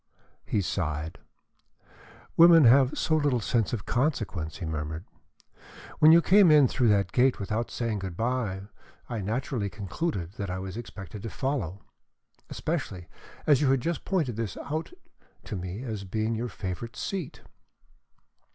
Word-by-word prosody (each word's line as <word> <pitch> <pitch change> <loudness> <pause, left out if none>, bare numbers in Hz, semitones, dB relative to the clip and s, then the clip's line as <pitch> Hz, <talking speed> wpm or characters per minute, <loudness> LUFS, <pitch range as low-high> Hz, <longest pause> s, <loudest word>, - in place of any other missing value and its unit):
He 105 - +1
sighed. 80 -3 -3 1.2
"Women 165 -1 +8
have 130 +2 +5
so 160 - +1
little 145 -5 +2
sense 115 -1 0
of 110 -5 -3
consequence," 110 - -1
he 90 - -5
murmured. 80 +2 -4 0.9
"When 155 +1 +8
you 170 +1 +7
came 195 -1 +6
in 150 -3 +7
through 125 0 +1
that 100 -4 +2
gate 130 +1 +3
without 110 +3 -2
saying 115 -3 -2
good 95 -3 -6
bye, 115 -5 -1 0.5
I 115 -3 -3
naturally 110 +1 -2
concluded 100 - -3
that 100 -2 -4
I 90 - -3
was 95 0 -6
expected 105 -3 -8
to 115 - -5
follow, 105 - -3 0.7
especially 90 -2 -4 0.4
as 145 -3 +4
you 140 - +3
had 135 -1 +3
just 165 +2 -2
pointed 150 - -1
this 115 -5 -3
out 155 - -4 0.5
to - - -6
me 95 +5 -5
as 110 -5 -4
being 110 +4 -1
your 120 +2 -3
favorite 95 +4 -6
seat." 185 -8 -4
115 Hz, 150 wpm, -27 LUFS, 95-135 Hz, 1.2 s, Women